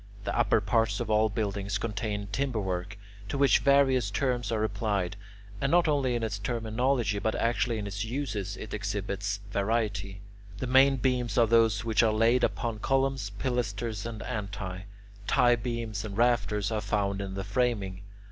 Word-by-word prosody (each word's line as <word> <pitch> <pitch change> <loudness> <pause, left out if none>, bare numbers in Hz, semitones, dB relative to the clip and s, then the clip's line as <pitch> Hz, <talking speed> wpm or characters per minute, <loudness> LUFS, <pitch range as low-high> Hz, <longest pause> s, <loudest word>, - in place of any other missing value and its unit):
The - - -2
upper - - +3
parts 110 -3 +1
of 115 -2 -2
all 110 +1 +4
buildings 100 -2 -2
contain 105 -2 -3
timber 135 -2 -1
work 95 0 -3 0.3
to 140 - -2
which 140 0 +5
various 135 -5 +3
terms 125 +1 -1
are 110 -1 0
applied. 100 -3 -1 0.5
And 140 - +1
not 175 -1 +4
only 140 -5 +1
in 120 - -2
its 105 -3 -2
terminology 115 0 0
but 110 - -1
actually 115 0 0
in 105 - -4
its 100 0 -3
uses 110 -5 -3
it 110 - -8
exhibits 100 -1 -3
variety. 100 -2 -1 0.4
The 115 - -3
main 135 +2 +5
beams 125 -2 0
are 120 - +6
those 115 -1 +3
which 110 -2 +3
are 115 -2 +3
laid 115 +3 +3
upon 115 -4 -1
columns, 135 -3 0
pilasters, 115 -3 -2
and 110 -3 -6
antae; 100 -3 -5 0.4
tie 120 0 +4
beams 115 -3 -4
and 105 -2 -6
rafters 105 -4 +2
are 110 -1 -1
found 100 -2 -1
in 95 -1 -5
the 95 - -3
framing. 100 -3 -1
110 Hz, 165 wpm, -28 LUFS, 100-120 Hz, 0.5 s, are